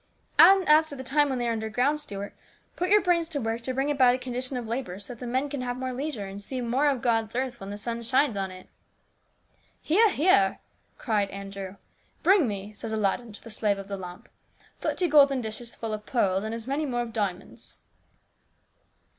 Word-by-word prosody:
And 385 -1 +8
as 310 +1 +6
to 285 - -6
the 260 - -7
time 290 +2 +2
they 240 -1 -1
are - - +1
underground, 230 +7 0
Stuart, 200 -8 -6 0.4
put 360 +1 -1
your 415 -1 +5
brains 340 -2 +2
to 300 -3 -2
work 225 -1 -2
to 260 +2 -3
bring 275 +2 +1
about 255 -3 +5
a - - -2
condition 255 +1 -4
of 240 -2 -5
labour 230 -6 -3
so 205 +4 -8
that 235 - -15
the 250 - -6
men 260 +4 0
can 285 -2 -4
have 245 0 -3
more 255 0 -3
leisure, 265 -5 -3
and 195 +1 -8
see 255 +5 -4
more 250 +4 +1
of 270 -4 0
God's 225 -2 +1
earth 255 -1 -2
when 195 - -7
the 205 - -5
sun 235 +2 -4
shines 255 +1 +2
on 195 -1 -2
it." 185 0 -12 0.6
" - - -39
Hear! 420 +8 +4
hear! 290 - +3 0.2
" - - -41
cried 210 -4 0
Andrew. 195 -1 -7 0.2
" - - -39
' - - -38
Bring 370 -6 +5
me/ 205 0 -5
says 220 +1 -6
Aladdin 220 +2 0
to - - -11
the 230 - -9
slave 210 -2 +1
of 195 0 -8
the 200 - -2
lamp, 180 +3 -9 0.3
* - - -31
thirty 360 - 0
golden 280 -3 +5
dishes 230 +1 -6
full 225 -1 -4
of 210 0 -6
pearls, 195 -6 +1
and 220 +1 -3
as 230 -1 -7
many 285 +3 -1
more 240 -2 -1
full 240 - -3
of - - -13
diamonds.' 200 -5 -3
240 Hz, 230 wpm, -27 LUFS, 210-275 Hz, 0.6 s, And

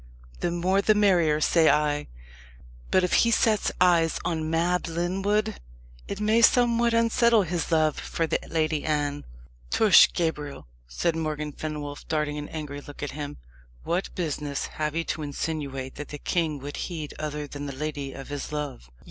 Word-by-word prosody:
The - - 0
more 180 +3 +1
the 215 +1 +3
merrier, 175 -7 +3
say 160 +1 +4
I. 150 0 +1 0.8
But 185 - +3
if 180 - 0
he 235 - +3
sets 220 -2 +2
eyes 170 -3 +4
on 160 -3 -1
Mab 175 +2 +1
Lyndwood 195 +6 0 0.5
it 200 - -5
may 215 +2 +3
somewhat 235 -1 +4
unsettle 230 -1 +4
his 175 -1 -3
love 155 -2 +2
for 165 - -2
the - - 0
Lady 155 -2 0
Anne." 145 -1 -1 0.4
"Tush, 215 -5 +7
Gabriel!" 150 -4 -3 0.2
said 160 - -1
Morgan 155 -2 -3
Fenwolf, 145 -1 -6
darting 150 -1 -1
an 150 - -7
angry 145 -2 -6
look 145 0 -10
at 145 - -3
him. 145 - -6 0.5
"What 175 +3 -2
business 150 -5 -2 0.2
have 150 0 -1
you 165 - 0
to 165 - -3
insinuate 140 -3 -4
that 150 - -6
the 150 - -7
king 160 0 -1
would 145 +1 -6
heed 160 -5 -5
other 150 -1 -3
than 145 0 -7
the - - -4
lady 145 -1 -4
of 135 +1 -9
his 145 0 -5
love?" 145 - -5
155 Hz, 165 wpm, -26 LUFS, 145-180 Hz, 0.8 s, Tush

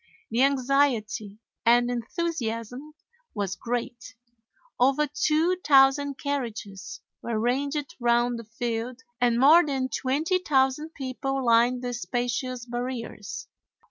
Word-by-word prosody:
The 235 +3 +1
anxiety 260 -6 +1 0.3
and 240 +1 +4
enthusiasm 245 - -4 0.4
was 200 -2 -2
great. 240 +2 -5 0.6
Over 270 +4 +3
2,000 290 -3 +3
carriages 235 -8 -5 0.2
were 230 -2 -2
ranged 280 +5 -1
round 240 0 +2
the - - -8
field 235 +2 -4 0.2
and 240 -1 +3
more 310 +7 +7
than 270 -3 -2
20,000 300 0 0
people 270 0 -3
lined 240 +2 +3
the 245 0 -3
spacious 245 0 -3
barriers. 240 -3 -5
255 Hz, 100 wpm, -26 LUFS, 235-280 Hz, 0.6 s, more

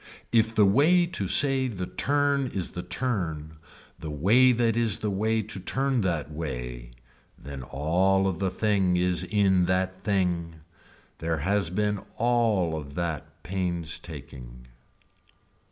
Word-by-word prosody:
If 115 -1 +2
the 105 - +5
way 155 - +4
to 105 - -3
say 135 +3 +4
the 95 -7 -4
turn 140 +3 0
is 95 -7 -3
the 90 - -5
turn 90 -6 -3 0.4
the 80 - -6
way 105 - +4
that 115 -2 +1
is 115 -3 +1
the 105 - -2
way 110 +3 0
to 100 -2 -6
turn 130 +5 0
that 85 -6 -2
way 60 -6 -6 0.5
then 70 -1 -8
all 85 +9 +1
of 95 -3 -1
the 95 -1 0
thing 95 -2 +1
is 90 0 +1
in 95 -2 +2
that 95 +1 0
thing. 90 -5 -1 0.6
There 80 0 -1
has 100 -2 +1
been 105 +2 -1 0.2
all 110 -8 +1
of 70 -2 -7
that 85 -4 -5
painstaking. 80 -9 -5
95 Hz, 135 wpm, -26 LUFS, 80-110 Hz, 0.6 s, the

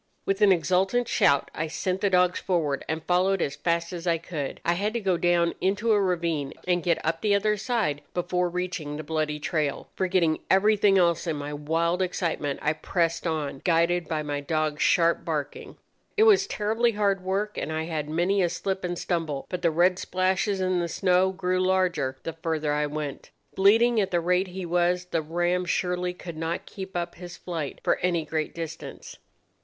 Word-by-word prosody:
"With 195 +1 -1
an 205 -2 +6
exultant 190 +7 +2
shout 140 - +2
I 155 - -2
sent 185 +4 -2
the 200 - +2
dogs 180 -1 +3
forward, 160 -7 -1
and 160 0 -2
followed 185 +3 +2
as 145 -4 -1
fast 170 +3 -1
as 175 0 -6
I 170 -1 +3
could. 160 -4 -5
I 170 - +3
had 205 +5 -1
to 235 - -1
go 190 -4 +1
down 170 0 +2
into 205 +5 +1
a 205 -1 +4
ravine 170 -6 -1
and 175 -1 +2
get 170 -2 +1
up 165 +1 -1
the 210 -2 +3
other 210 +1 +2
side 205 - -1
before 180 0 0
reaching 175 -4 -4
the 155 - -5
bloody 155 -1 -1
trail. 150 -2 -2
Forgetting 180 -4 +1
everything 205 0 +4
else 170 -1 +2
in 160 - 0
my 145 0 -5
wild 165 +4 0
excitement, 170 -6 -1
I 150 - +2
pressed 170 +1 -1
on, 150 -4 -3
guided 170 -1 +2
by 155 -1 -2
my 145 -1 -3
dogs' 155 0 -1
sharp 170 -1 +3
barking. 150 -3 -4 0.4
It 430 - +6
was 400 -3 +5
terribly 225 - +1
hard 200 -2 +1
work, 200 +3 -1
and - - -3
I 160 0 -2
had 155 -2 -3
many 175 +5 +1
a 175 - +2
slip 190 +2 -3
and 175 -1 -2
stumble; 160 -7 -2
but 180 - -4
the 170 - +3
red 175 +3 +3
splashes 190 +2 0
in 185 -1 +1
the 170 - -1
snow 185 +2 +2
grew 185 -1 -1
larger 185 -8 +1
the 165 - -4
further 160 -2 -2
I 150 0 0
went. 150 -2 -5 0.2
Bleeding 225 +4 +4
at 195 - -1
the 175 - +1
rate 180 +2 +1
he 185 0 -6
was, 175 +1 +1
the 165 -2 -1
ram 175 +3 0
surely 180 0 -1
could 170 -3 -8
not 165 +2 -3
keep 190 -2 -7
up 170 0 -3
his 175 0 -10
flight 165 -5 -5
for - - +2
any 170 -3 0
great 155 0 -3
distance. 165 -1 -7
175 Hz, 195 wpm, -26 LUFS, 160-190 Hz, 0.4 s, an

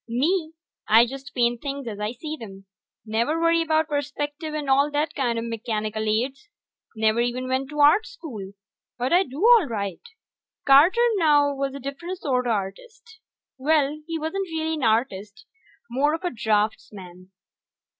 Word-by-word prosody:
Me, 315 +7 0 0.3
I 225 +2 +6
just 270 +3 -9
paint 240 -1 +1
things 280 -1 -5
as 210 -2 -6
I 210 +1 -2
see 305 +5 -6
'em. 195 -3 -10 0.4
Never 235 +9 0
worry 335 0 +3
about 315 -1 +1
perspective 295 +1 -3
and 300 -2 -4
all 275 +2 +3
that 295 +1 -1
kinda 235 -5 -1
mechanical 220 -1 -3
aids. 265 - -2 0.5
Never 220 +1 +2
even 245 +2 -2
went 260 +1 -1
to 295 -1 -2
Art 305 +10 +5
School. 230 - -9 0.4
But 250 +5 -1
I 360 - +6
do 270 -6 -6
all 460 -8 +6
right. 200 -5 -4 0.6
Carter, 340 - +6
now, 290 -4 +4
was 275 0 -3
a - - -6
different 280 +8 -6
sorta 250 -7 -1
artist. 435 - -5 0.4
Well, 300 +1 +1
he 330 -1 -3
wasn't 325 +5 -3
really 320 0 -2
an 305 -4 -4
artist 220 - -1 0.5
more 290 +5 +2
of 330 - -9
a 355 - -1
draftsman. 205 -5 -2
275 Hz, 155 wpm, -24 LUFS, 230-315 Hz, 0.6 s, I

